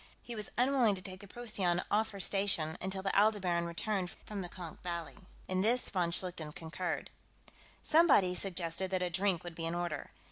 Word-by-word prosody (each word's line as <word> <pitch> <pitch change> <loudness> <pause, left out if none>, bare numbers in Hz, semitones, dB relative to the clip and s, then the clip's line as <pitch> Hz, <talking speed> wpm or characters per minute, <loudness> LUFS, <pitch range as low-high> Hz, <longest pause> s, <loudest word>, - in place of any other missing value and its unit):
He 240 - -5
was 210 -2 -2
unwilling 250 -4 +4
to 185 - -7
take 185 0 -8
the 200 - -11
Procyon 195 -6 0
off 220 +1 +3
her 200 - -7
station 195 -5 +1
until 190 +1 -2
the 195 - 0
Aldebaran 195 -5 +3
returned 185 +2 -1 0.2
from 205 -2 -4
the 175 - -5
Konk 175 -3 -8
Valley. 170 -2 -4 0.3
In 185 0 +1
this, 240 +5 +2
von 180 -3 +1
Schlichten 170 -3 0
concurred. 170 +2 -3 0.7
Somebody 290 - +5
suggested 180 -1 -2
that 185 -1 0
a 180 - -1
drink 190 -1 +1
would 175 -1 -6
be 165 0 -4
in 165 - -2
order. 175 -4 -3
185 Hz, 185 wpm, -33 LUFS, 175-205 Hz, 0.7 s, Somebody